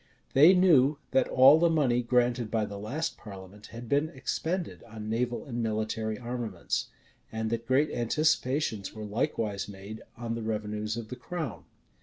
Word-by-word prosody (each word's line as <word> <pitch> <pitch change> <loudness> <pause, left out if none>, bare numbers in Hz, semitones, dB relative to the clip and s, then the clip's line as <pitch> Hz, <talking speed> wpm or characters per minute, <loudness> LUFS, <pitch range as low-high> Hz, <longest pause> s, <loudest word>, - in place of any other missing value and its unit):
They 155 +8 +8
knew 150 -6 +5
that 130 - +3
all 135 +4 +7
the 170 0 +4
money 135 -7 +2
granted 120 -1 +1
by 110 -1 0
the 100 -1 -7
last 150 +11 -3
parliament 100 0 -11
had 115 +1 -9
been 145 +5 +1
expended 165 +5 -3
on 110 -2 -7
naval 120 +1 -1
and 120 -3 -4
military 110 0 -2
armaments; 120 -7 -3 0.4
and 110 0 -3
that 115 0 -3
great 140 +4 +3
anticipations 130 -5 0
were 110 -1 -6
likewise 105 -2 -2
made 100 +2 -9 0.2
on 115 -1 -4
the 115 - -4
revenues 105 0 -3
of 115 -2 -6
the 125 - -5
crown. 160 -6 -6
115 Hz, 160 wpm, -29 LUFS, 110-135 Hz, 0.4 s, They